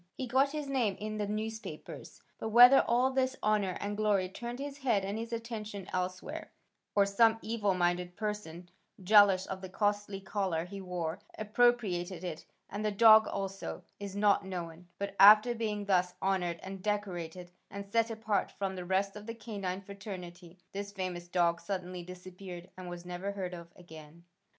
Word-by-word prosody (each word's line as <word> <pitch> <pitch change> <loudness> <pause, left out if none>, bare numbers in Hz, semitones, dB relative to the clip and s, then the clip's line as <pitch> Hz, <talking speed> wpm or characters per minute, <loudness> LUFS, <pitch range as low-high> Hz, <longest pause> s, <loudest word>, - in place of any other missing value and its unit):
He 260 - -4
got 260 +3 +3
his 300 -1 -3
name 240 -8 0
in 215 0 -4
the 205 - -1
newspapers, 220 +2 -6 0.2
but 220 - -3
whether 245 +4 +9
all 250 +3 +3
this 260 0 +1
honor 210 -3 +1
and 205 0 -3
glory 205 -3 +1
turned 240 +5 -6
his 280 +1 -6
head 230 -8 +1
and 200 +1 -3
his 230 +1 -5
attention 220 -4 -5
elsewhere, 185 - -4 0.4
or 200 -1 +5
some 225 +3 +4
evil 215 -4 0
minded 175 0 0
person, 190 -5 -5 0.3
jealous 200 -1 +6
of 190 -1 -6
the 190 - -7
costly 205 0 -1
collar 190 -4 -2
he 195 +2 -8
wore, 180 -2 -3 0.2
appropriated 210 -6 +1
it 170 -4 -6 0.2
and 205 +2 -5
the 215 - +2
dog 220 +1 +7
also, 195 -1 -4 0.2
is 200 -1 -6
not 205 0 +3
known, 175 -2 -6
but 200 0 -4
after 215 +4 +9
being 215 -3 -3
thus 180 -2 +2
honored 180 -3 0
and 190 0 -7
decorated 180 -4 -3 0.2
and 200 0 -7
set 230 +1 +2
apart 220 -2 -1
from 195 -1 -3
the 180 -1 -6
rest 195 +2 0
of 210 +1 -9
the 230 - -5
canine 200 -5 -4
fraternity, 185 -3 -9
this 200 0 -5
famous 185 -3 -4
dog 170 -1 +1
suddenly 180 0 -4
disappeared 180 0 -10
and 185 -1 -8
was 175 0 -8
never 180 +3 -4
heard 185 -2 -4
of 170 -1 -8
again. 160 -1 -13
200 Hz, 170 wpm, -31 LUFS, 180-215 Hz, 0.4 s, whether